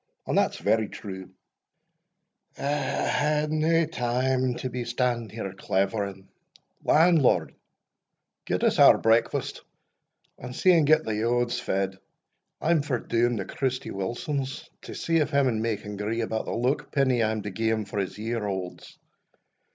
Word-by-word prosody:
And - - -1
that's - - +2
very 110 -1 +1
true 95 -3 -8 1.3
I - - -8
hae 150 +1 0
nae 160 +2 +2
time 130 -2 0
to 130 - -4
be 125 -1 -4
standing 120 -1 -1
here 105 -4 -6
clavering 95 0 -2 0.6
Landlord, 160 -3 +4 0.9
get - - -1
us - - +2
our - - +8
breakfast, 115 +1 +1 0.8
and 125 +1 -8
see 185 - +4
an' 165 -3 +4
get 155 +1 +4
the 110 - -2
yauds 120 +2 0
fed 95 0 -2 0.6
I 165 - 0
am 165 -3 +4
for 140 -3 -1
doun 120 +1 0
to 95 - -3
Christy 130 -1 -3
Wilson's, 130 +7 -4
to - - -9
see 165 0 0
if 150 - +2
him 140 -2 +2
and 110 -3 0
me 115 -2 0
can 105 0 -8
gree 110 +3 -2
about 110 -1 -2
the - - -4
luckpenny 130 +1 +1
I 110 - +2
am 110 -1 -3
to 105 - -5
gie 110 +4 -1
him 110 -1 0
for 100 +1 -4
his 95 0 -3
year 115 +2 -3
aulds. 95 -2 -6
120 Hz, 160 wpm, -26 LUFS, 105-140 Hz, 1.3 s, our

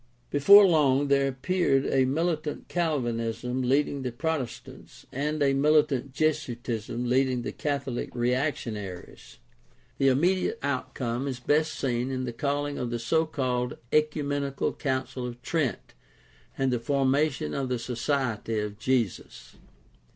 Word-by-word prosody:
Before 200 +8 +8
long 145 -5 +3
there 140 0 +3
appeared 135 +1 +1
a 130 -1 +2
mili 160 +3 0
tant 150 -1 -6
Calvinism 125 -6 -1
leading 140 +2 +1
the 125 -1 -3
Protestants 140 -1 -5
and 150 +3 -1
a 135 -1 +3
militant 140 -2 +2
Jesu 150 -3 0
itism 120 0 -4
leading 130 0 +1
the - - -3
Catholic 140 -4 -3
reactionaries. 120 - -3 0.6
The 135 - +3
immediate 175 +8 +2
outcome 130 -2 -2
is 130 -3 -4
best 155 +5 +1
seen 125 -1 -1
in 130 -1 -2
the 120 -2 -4
calling 145 +2 -2
of 125 - -2
the 120 - -2
so 160 +8 +1
called 125 -5 -2
Ecumenical 145 -2 0
Council 130 -2 -3
of 120 0 -8
Trent 150 -5 -2 0.6
and 135 -1 +1
the 120 - 0
formation 135 - +1
of 135 -2 -2
the 125 - 0
Society 120 -2 -2
of 105 0 -3
Jesus. 115 - -2
135 Hz, 135 wpm, -27 LUFS, 125-145 Hz, 0.6 s, Before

